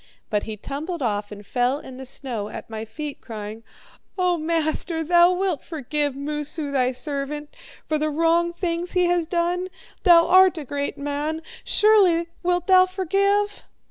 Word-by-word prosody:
But 210 -1 +1
he 220 -1 -6
tumbled 295 - -5
off 205 -2 -2
and 205 0 -10
fell 250 +4 +1
in 260 -3 -10
the 265 0 -8
snow 245 -6 -5
at - - -9
my 220 0 -5
feet, 290 +6 -7
crying: 215 -1 -7 0.6
'O 360 -1 +2
master, 320 0 -1
thou 345 +2 +5
wilt 365 -5 -1
forgive 295 -2 -2
Moosu, 295 +1 -3
thy 255 -2 +2
servant, 290 +2 -4 0.3
for 310 -1 0
the 310 +1 0
wrong 330 +3 +2
things 345 0 -3
he 360 -1 +3
has 345 -2 +1
done! 350 +1 0 0.3
Thou 340 -3 +7
art 370 0 +6
a 305 - -5
great 285 +2 -3
man! 290 +3 -3 0.2
Surely 375 -6 +4
wilt 355 -1 0
thou 370 -1 +6
forgive!' 395 +3 0
315 Hz, 160 wpm, -23 LUFS, 275-355 Hz, 0.6 s, Thou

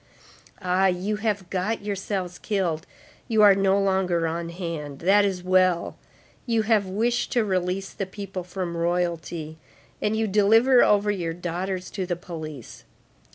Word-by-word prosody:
Ah! 185 +1 +3
you 190 +3 -1
have 210 -4 -2
got 195 +4 -1
yourselves 195 -3 -3
killed! 175 -7 -1 0.4
You 220 -2 +3
are 205 -1 +9
no 195 0 +2
longer 190 -3 +1
on 165 +1 -3
hand! 165 -5 -5
That 195 +6 +4
is 190 -3 -1
well; 185 -1 +2 0.5
you 230 -2 +2
have 215 -3 +2
wished 230 +6 0
to 240 -3 +2
release 185 0 -1
the 195 - -4
people 195 -1 -6
from 180 -1 -4
Royalty, 170 -2 -2 0.4
and 215 +1 0
you 220 - +1
deliver 225 +5 +5
over 210 0 +3
your 170 -5 -2
daughters 180 +2 -4
to 190 -3 -3
the 175 - -1
police. 155 -7 -9
185 Hz, 150 wpm, -25 LUFS, 175-205 Hz, 0.5 s, are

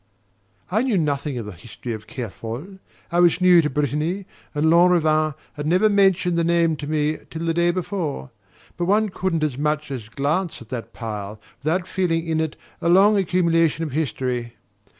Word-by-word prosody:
I 215 +4 +2
knew 250 -6 +1
nothing 145 -4 -1
of 115 - -4
the 105 - -6
history 110 +6 -8
of 110 -1 -8
Kerfol 120 - -7 0.3
I 175 - +2
was 175 0 +4
new 180 -2 +6
to 150 - -1
Brittany, 150 +7 -1 0.3
and 150 +1 +1
Lanrivain 160 -3 +4 0.2
had 145 0 -5
never 185 +6 +4
mentioned 190 -4 +3
the - - +2
name 170 -1 +2
to 145 - -6
me 155 0 0
till 165 +1 -5
the 165 - +1
day 170 +1 +2
before 175 -6 -3 0.5
but 175 - -1
one 210 +3 +2
couldn't 180 -4 -1
as 140 -4 -1
much 150 0 -1
as 115 -5 -6
glance 150 +8 -1
at 115 - -13
that 120 -3 -5
pile 105 -2 -6 0.2
without 170 +4 0
feeling 175 -3 0
in 160 -1 0
it 160 -1 -2 0.3
a 170 - +1
long 195 +4 +6
accumulation 165 -4 +2
of 155 - -4
history. 125 -5 -2
160 Hz, 180 wpm, -22 LUFS, 140-180 Hz, 0.5 s, new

